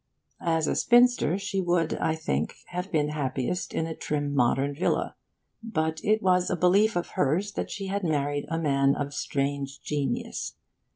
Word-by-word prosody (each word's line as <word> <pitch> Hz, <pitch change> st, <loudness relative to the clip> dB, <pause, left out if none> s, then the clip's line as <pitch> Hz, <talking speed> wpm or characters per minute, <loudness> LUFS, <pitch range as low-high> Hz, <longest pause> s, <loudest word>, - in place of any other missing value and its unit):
As 165 Hz, -1 st, +2 dB
a -, -, 0 dB
spinster, 240 Hz, -7 st, +4 dB
she 195 Hz, -1 st, -2 dB
would, 175 Hz, -2 st, +1 dB
I 160 Hz, -, 0 dB
think, 75 Hz, -, -2 dB
have 180 Hz, +2 st, -4 dB
been 150 Hz, -2 st, +1 dB
happiest 145 Hz, +3 st, -2 dB
in 160 Hz, -, -1 dB
a 165 Hz, -, -4 dB
trim 145 Hz, -2 st, -2 dB
modern 135 Hz, +2 st, +2 dB
villa. 160 Hz, +6 st, 0 dB, 0.5 s
But 160 Hz, -8 st, -2 dB
it 215 Hz, +1 st, +2 dB
was 180 Hz, -1 st, +3 dB
a -, -, +1 dB
belief 195 Hz, +5 st, +3 dB
of 175 Hz, -, -1 dB
hers 175 Hz, +9 st, 0 dB
that -, -, -4 dB
she 200 Hz, -, -5 dB
had 200 Hz, +1 st, -2 dB
married 145 Hz, -3 st, 0 dB
a 165 Hz, -, -1 dB
man 140 Hz, -3 st, +2 dB
of 145 Hz, -1 st, -3 dB
strange 140 Hz, -1 st, -2 dB
genius. 140 Hz, -4 st, -2 dB
160 Hz, 170 wpm, -27 LUFS, 145-180 Hz, 0.5 s, spinster